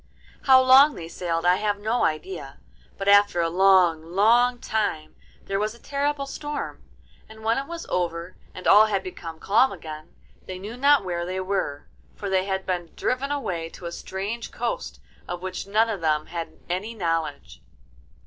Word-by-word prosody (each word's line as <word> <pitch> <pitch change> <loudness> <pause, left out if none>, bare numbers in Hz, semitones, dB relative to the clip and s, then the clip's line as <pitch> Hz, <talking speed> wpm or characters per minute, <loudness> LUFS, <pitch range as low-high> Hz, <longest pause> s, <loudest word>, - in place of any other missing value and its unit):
How 265 -1 +8
long 265 +3 +7
they 165 - -7
sailed 170 -1 -3
I 180 +1 +5
have 205 0 0
no 220 +4 0
idea, 270 - -3 0.4
but 195 - -5
after 205 -3 +5
a 165 -1 +1
long, 185 -3 +4
long 230 +8 +3
time 205 -10 -2 0.3
there 195 0 -1
was 215 +2 -2
a - - -17
terrible 280 +1 -2
storm, 295 +1 -5 0.5
and 220 0 -13
when 230 +3 +2
it 275 - -6
was 335 -1 -6
over 175 0 -2 0.2
and 185 - -9
all 215 +2 +7
had 195 -3 -1
become 165 -3 -8
calm 240 +6 +3
again, 155 -1 -9 0.3
they 185 - -5
knew 205 +5 -7
not 280 -3 +4
where 175 -1 -2
they 185 +2 -3
were, 185 -7 -2 0.3
for 200 -2 -5
they 190 0 +2
had 190 -1 -2
been 175 -3 -3
driven 270 +3 -1
away 180 - -3
to 175 - -12
a 170 - -4
strange 200 +7 -5
coast - - -4 0.3
of 175 0 -5
which 185 +1 -5
none 215 +3 +3
of 210 -5 -4
them 155 -1 +1
had 170 -1 -6
any 200 +6 -3
knowledge. 165 -6 -3
195 Hz, 175 wpm, -25 LUFS, 175-235 Hz, 0.5 s, How